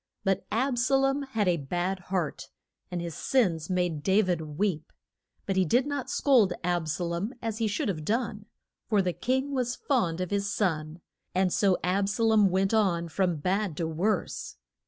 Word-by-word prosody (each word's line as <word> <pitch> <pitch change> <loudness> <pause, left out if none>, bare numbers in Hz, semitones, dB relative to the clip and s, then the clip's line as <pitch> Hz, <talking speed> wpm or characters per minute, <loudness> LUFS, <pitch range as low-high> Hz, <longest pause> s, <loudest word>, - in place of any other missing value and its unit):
But 195 -1 0
Ab 250 +2 +1
sa 250 +3 +3
lom 270 +1 +2
had 225 -7 -1
a 175 -1 +3
bad 175 +6 -2
heart, 160 -7 -2 0.4
and 180 -2 -3
his 170 -1 -4
sins 175 - +1
made 180 -4 0
Da 195 +6 +3
vid 180 -4 0 0.2
weep. 175 -6 -1 0.5
But 195 -1 -1
he 190 - +5
did 245 - +2
not 285 -3 -3
scold 235 -10 +4
Ab 175 -2 0
sa 160 +4 -2
lom 175 +8 -3
as 225 -2 -4
he 225 - +1
should 210 0 -1
have 165 -6 -2
done, 215 +1 -2 0.4
for 210 -4 +3
the 180 -1 0
king 265 +7 -1
was 245 -2 0
fond 185 - 0
of 185 -1 -3
his 200 0 0
son, 160 -5 -1 0.3
and 185 -1 +2
so 195 -3 +3
Ab 195 +2 +1
sa 230 +3 -1
lom 220 -3 +5
went 190 +3 +1
on 175 -6 +2
from 180 +1 +1
bad 185 +2 -1
to 165 - -1
worse. 175 +7 -2
195 Hz, 190 wpm, -28 LUFS, 175-225 Hz, 0.5 s, he